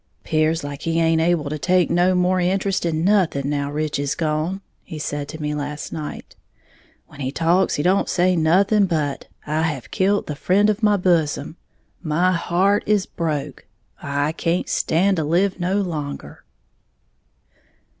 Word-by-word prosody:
"'Pears 155 +1 +1
like 145 0 -6
he 165 0 -1
haint 165 -1 +3
able 165 -3 +1
to 150 +1 -4
take 180 +5 +2
no 180 +2 +3
more 180 +1 +2
interest 190 +1 0
in 160 0 -1
nothing, 180 -9 +2
now 145 0 -2
Rich 150 -1 -2
is 145 0 -1
gone," 160 +4 -2 0.2
he 160 - -8
said 145 -1 -4
to 155 - -8
me 150 -1 -2
last 150 0 -5
night; 155 -2 -7 0.7
"when - - -16
he 130 -1 -2
talks 170 +5 +2
he 145 - -1
don't 185 +3 +2
say 180 0 +2
nothing 195 +5 +3
but 150 -5 -2 0.2
'I 155 +2 -1
have 150 -6 -3
killed 200 +1 +1
the 150 - -5
friend 200 +7 +2
of 210 +2 -5
my 210 -1 +3
bosom, 160 -5 0 0.5
my 175 +3 +1
heart 185 +4 +1
is 210 -2 +2
broke, 155 -4 -4 0.3
I 145 +2 -1
can't 170 +2 -1
stand 190 +4 +1
to 160 - 0
live 180 +5 +1
no 180 +2 0
longer.'" 145 - -6
165 Hz, 165 wpm, -21 LUFS, 150-185 Hz, 0.7 s, haint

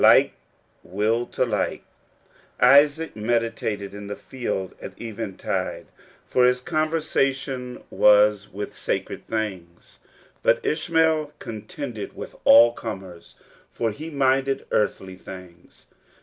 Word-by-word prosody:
Like - - +6 0.5
will 110 +6 0
to - - 0
like. 110 -4 -2 0.8
Isaac 145 +5 +5
meditated 110 -2 -1
in 100 0 -8
the 100 - -4
field 105 -7 -4
at - - -9
eventide, 110 -4 -4 0.4
for 125 - +2
his 125 0 +2
conversation 135 -4 -1
was 105 -1 +4
with 105 +2 -6
sacred - - -4
things; 95 -6 -5 0.4
but - - +3
Ishmael 160 -2 +1
contended 110 +1 -7
with - - -8
all 115 +1 +8
comers, 95 -7 -8 0.3
for 115 -2 -2
he 155 +9 -7
minded 135 -2 +1
earthly 95 -3 0
things. 90 -1 -13
115 Hz, 105 wpm, -24 LUFS, 100-135 Hz, 0.8 s, all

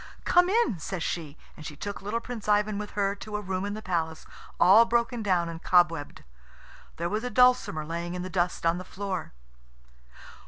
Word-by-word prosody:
"Come 355 +1 +4
in," 420 - +2
says 175 +2 -4
she, 155 -3 -4 0.2
and 155 - -11
she 150 - -7
took 200 +6 -6
little 210 +4 -2
Prince 230 -3 -7
Ivan 210 0 +2
with 210 -1 -7
her 200 -1 +1
to 210 +1 -7
a - - -1
room 190 -1 -3
in 205 0 -3
the 215 - -8
palace, 160 -4 -2 0.3
all 200 +6 +8
broken 235 0 0
down 180 -5 +1
and 165 0 -7
cobwebbed. 165 -5 +2 0.7
There 170 - -2
was 215 +5 -2
a 250 - -2
dulcimer 250 -12 +3
lying 170 +2 -4
in 180 - -4
the - - -4
dust 180 -2 -1
on 165 +1 +2
the - - -6
floor. 190 0 -5
190 Hz, 195 wpm, -27 LUFS, 170-215 Hz, 0.7 s, all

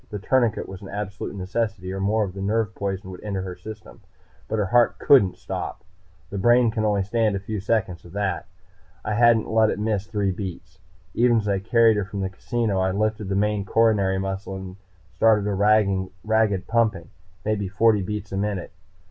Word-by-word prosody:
The 105 - -5
tourniquet 115 +1 +1
was 95 -1 -9
an 95 - -9
absolute 100 0 -5
necessity, 95 -1 -3
or 95 - -4
more 105 +3 +1
of 95 -3 -4
the 95 - -7
nerve 105 +1 0
poison 95 -1 -4
would 90 - -10
enter 100 -3 -3
her 90 -1 -6
system. 110 +2 -11 0.5
But 110 - -2
her 105 - +1
heart 120 +4 +3
couldn't 105 -10 +4
stop. - - -5 0.5
The 100 - -3
brain 120 +2 +4
can 110 0 -2
only 105 -2 +1
stand 110 +1 +1
a - - -2
few 105 +2 -4
seconds 95 -4 -1
of 85 - -13
that. 100 -4 -2 0.6
I 105 - -1
hadn't 115 0 +4
let 110 -1 +3
it - - -2
miss 105 -2 -1
three 105 -3 0
beats. 90 -1 -7 0.3
Even 120 0 +3
as 105 -2 -1
I 100 -1 +1
carried 115 +2 +4
her 105 - -1
from 100 0 -5
the 95 - -1
casino, 110 0 -1
I 95 0 +2
lifted 105 +1 -1
the 95 - 0
main 105 0 +1
coronary 100 -3 +2
muscle 95 0 -4
and 95 0 -8 0.4
started 105 -1 +4
a 105 - 0
ragged 100 0 +1
pumping, 110 -8 0 0.4
maybe 105 -2 0
forty 105 +2 +3
beats 105 +1 -5
a 95 - -2
minute. 100 -2 -2
105 Hz, 195 wpm, -24 LUFS, 95-110 Hz, 0.6 s, couldn't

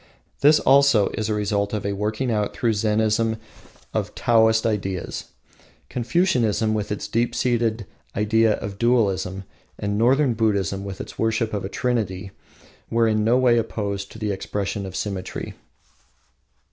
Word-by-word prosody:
This, 150 +2 +6
also, 135 -6 +5
is 110 +1 -3
a 105 - +1
result 100 0 -1
of 105 -2 -2
a 100 - 0
working 110 +5 -1
out 105 -2 -1
through 115 -2 +1
Zennism 110 +1 +1 0.6
of - - -2
Taoist 110 -1 +3
ideals. 95 -5 -2 0.6
Confucianism, 120 - +1
with 105 -1 -2
its 105 - -3
deep 120 +1 0
seated 115 -3 0 0.3
idea 110 +1 +3
of 100 -1 -6
dualism, 100 -6 +1 0.3
and 100 0 -2
Northern 130 +3 +3
Buddhism 100 -4 0
with 100 -1 -6
its - - -10
worship 110 0 0
of 100 - -2
a 95 - -4
trinity, 100 -6 -2 0.6
were 115 0 +2
in 110 -1 +1
no 115 +3 +3
way 125 -2 +4
opposed 100 -3 -3
to - - -10
the 105 -2 -2
expression 100 0 -3
of 95 - -8
symmetry. 95 -2 -4
110 Hz, 145 wpm, -23 LUFS, 100-115 Hz, 0.6 s, This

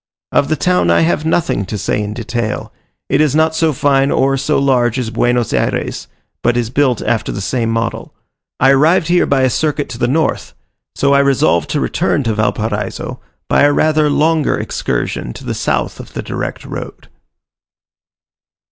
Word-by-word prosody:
Of 140 - +2
the 155 - +1
town 180 - +1
I 85 - +4
have 160 -1 +1
nothing 160 -10 0
to 105 - -4
say 105 - -1
in 105 0 -4
detail: 115 -2 -4 0.3
it 140 +2 +2
is 150 -2 +2
not 160 0 +3
so 160 0 +2
fine 135 0 +2
or 135 0 +2
so 140 +3 0
large 125 -3 +2
as 120 -3 -2
Buenos 120 -1 0
Ayres, - - -1 0.3
but 120 0 +1
is 120 -1 -1
built 130 -4 +1
after 115 -2 -1
the - - -5
same 115 +3 -1
model. 115 0 -2 0.5
I 135 +1 +5
arrived 155 +5 +3
here 175 0 +3
by 140 -1 +2
a 130 - +3
circuit 150 0 -1
to 120 - -7
the 120 - +1
north; 155 +4 -1 0.4
so 140 0 +2
I 140 - +5
resolved 135 - +2
to - - 0
return 145 - 0
to 115 -2 0
Valparaiso 105 -1 -2 0.3
by - - +3
a 145 0 +5
rather 155 0 +2
longer 155 +1 +2
excursion - - -3
to - - -11
the - - -2
south - - -2
of - - -11
the - - -4
direct - - -5
road. - - -8
135 Hz, 180 wpm, -16 LUFS, 115-150 Hz, 0.5 s, I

